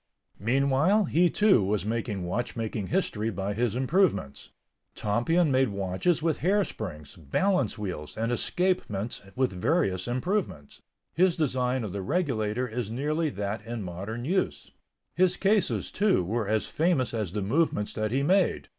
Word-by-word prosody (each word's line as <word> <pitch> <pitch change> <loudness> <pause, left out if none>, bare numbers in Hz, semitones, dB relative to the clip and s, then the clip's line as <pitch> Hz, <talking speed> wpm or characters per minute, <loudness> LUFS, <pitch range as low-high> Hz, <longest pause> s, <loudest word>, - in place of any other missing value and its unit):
Meanwhile, 140 - +3
he, 175 +2 +3
too, 205 - +4
was 100 +1 0
making 110 -3 -2
watchmaking 110 0 -3
history 115 - 0
by 100 0 -3
his 115 0 0
improvements. 130 - 0 0.5
Tompion 140 +10 +1
made 130 0 +3
watches 100 - 0
with 165 -3 +1
hair 200 +4 +3
springs, 75 - -7
balance 120 - 0
wheels 90 -7 -5
and 115 +2 -1
escapements 120 - -1
with 130 -1 +1
various 95 - 0
improvements. 125 - -2 0.3
His 180 0 +3
design 130 -5 0
of 100 -4 -5
the 100 - -3
regulator 125 - -1
is 120 -2 -4
nearly 150 +7 -1
that 105 -2 -4
in 115 -1 -5
modern 100 +7 -5
use. 185 +5 -1 0.4
His 180 -1 +2
cases, 200 +1 +1
too, 195 - +2
were 110 +4 -2
as 110 0 +1
famous 155 -7 0
as 105 -6 -2
the 105 -2 -2
movements 110 -2 0
that 110 0 -1
he 135 +5 0
made. 190 +6 +2
120 Hz, 145 wpm, -27 LUFS, 105-165 Hz, 0.5 s, too